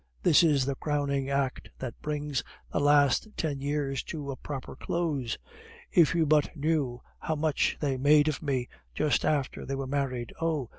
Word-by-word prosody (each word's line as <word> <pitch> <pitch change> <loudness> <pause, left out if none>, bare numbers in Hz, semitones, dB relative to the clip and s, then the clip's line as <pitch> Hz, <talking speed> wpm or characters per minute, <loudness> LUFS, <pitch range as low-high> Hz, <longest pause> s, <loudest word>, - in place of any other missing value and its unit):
this 150 - +6
is 145 -6 +3
the 140 - 0
crowning 140 -1 -1
act 140 -2 -1
that 130 -3 -5
brings 150 -3 -2 0.3
the - - +1
last 145 - +4
ten 145 -4 -1
years 140 -1 -1
to 145 -4 -5
a - - -4
proper 135 -1 -7
close. 150 -9 -2 0.5
If 170 -4 +5
you 165 -2 +3
but 150 -1 +3
knew 145 -5 0 0.2
how 160 - -2
much 155 -1 +1
they 140 -3 0
made 145 +3 +5
of 155 - -1
me 135 -5 -1 0.3
just 145 -6 +2
after 145 -4 0
they 135 - -3
were 135 0 -3
married. 130 -3 -2
(Oh! 155 -7 0
145 Hz, 170 wpm, -29 LUFS, 135-150 Hz, 0.5 s, this